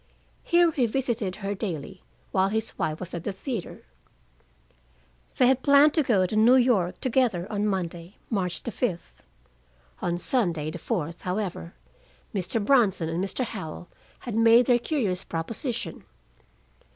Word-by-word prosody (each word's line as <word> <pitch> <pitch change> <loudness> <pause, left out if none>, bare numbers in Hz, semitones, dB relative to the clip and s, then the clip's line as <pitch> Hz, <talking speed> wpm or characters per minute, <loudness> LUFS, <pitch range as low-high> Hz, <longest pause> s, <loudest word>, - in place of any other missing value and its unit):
Here 345 -1 +4
he 290 - -3
had 235 -3 +2
visited 235 -7 -1
her 200 -1 -3
daily, 185 -3 -5 0.3
while 190 0 +2
his 220 +1 -2
wife 155 0 -2
was 185 -1 -7
at 170 - -4
the 205 - -2
theater. 225 - -6 1.5
They 255 - +5
had 260 +1 +3
planned 285 +2 +6
to 320 - +3
go 210 -9 +2
to 200 - -3
New 225 +4 +6
York 235 -9 +2
together 240 -8 +1
on 210 0 0
Monday, 175 -2 -4
March 185 -6 -2
the 235 - -4
fifth. 195 -7 -4 0.8
On 175 0 -1
Sunday, 175 - 0
the 175 - -7
fourth, 170 -5 -3
however, 180 - -4 0.6
Mr. 190 +3 -1
Bronson 200 -11 +3
and 170 +3 -1
Mr. 200 +6 -2
Howell 175 -5 -7 0.3
had 240 - -6
made 230 +2 +6
their 245 0 +4
curious 220 - -1
proposition. 230 - -4
205 Hz, 150 wpm, -26 LUFS, 180-245 Hz, 1.5 s, planned